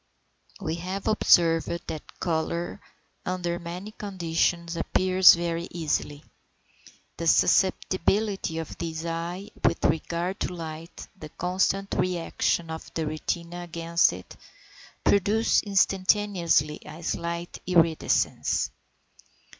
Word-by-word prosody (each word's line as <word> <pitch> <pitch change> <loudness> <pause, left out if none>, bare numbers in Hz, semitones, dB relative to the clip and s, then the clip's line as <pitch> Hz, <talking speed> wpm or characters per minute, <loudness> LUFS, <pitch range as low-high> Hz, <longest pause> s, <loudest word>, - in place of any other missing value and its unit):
690. - - -10
We 170 +3 -3
have 195 +1 -3
observed 170 -5 +3
that 155 - -8
colour 170 0 -2 0.4
under 175 -1 -2
many 180 +5 -7
conditions 170 -4 -1
appears 185 +2 +5
very 170 0 -2
easily. 150 -3 -2 0.9
The 165 - -3
susceptibility 190 +1 +2
of 165 -1 -5
the 165 -1 -4
eye 175 +5 -4
with - - +2
regard 170 +4 -1
to 180 - -3
light, 165 0 -8
the 155 -5 -10
constant 190 +4 -1
re 180 -1 +1
action 165 0 -1
of 160 - -7
the 160 - -1
retina 170 +3 -3
against 170 0 +2
it, 90 +1 -10 0.7
produce 210 +3 +3
instantaneously 190 -5 +2
a 165 +2 -10
slight 170 +1 -3
iridescence. 165 -3 +2
170 Hz, 105 wpm, -26 LUFS, 165-185 Hz, 0.9 s, appears